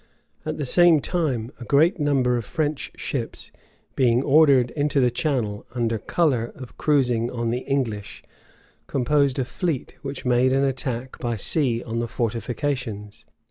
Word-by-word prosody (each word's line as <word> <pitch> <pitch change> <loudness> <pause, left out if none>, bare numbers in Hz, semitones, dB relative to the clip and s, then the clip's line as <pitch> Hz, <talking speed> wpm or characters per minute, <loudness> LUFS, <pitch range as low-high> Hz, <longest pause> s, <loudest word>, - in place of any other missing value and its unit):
At 155 - -2
the 145 - -2
same 175 +3 +5
time, 135 -9 -1
a - - -7
great 160 - +3
number 135 -4 +2
of 120 - -2
French 150 +5 -2
ships, - - -4 0.4
being 125 -1 +3
ordered 140 -4 +5
into 145 -1 0
the 125 -2 +3
Channel, 120 -7 -1
under 115 -2 0
color 125 -3 0
of 130 -2 -11
cruising 125 -6 +1
on 120 -2 -2
the 120 - -1
English, 125 -7 -3 0.6
composed 140 0 +1
a 130 - 0
fleet 160 0 -3
which 135 -1 -6
made 125 +1 +3
an 135 +1 +2
attack 130 -2 -3
by 120 -2 -2
sea 120 +1 0
on 115 0 -3
the 120 - -1
fortifications. 115 -1 -3
130 Hz, 150 wpm, -24 LUFS, 120-145 Hz, 0.6 s, same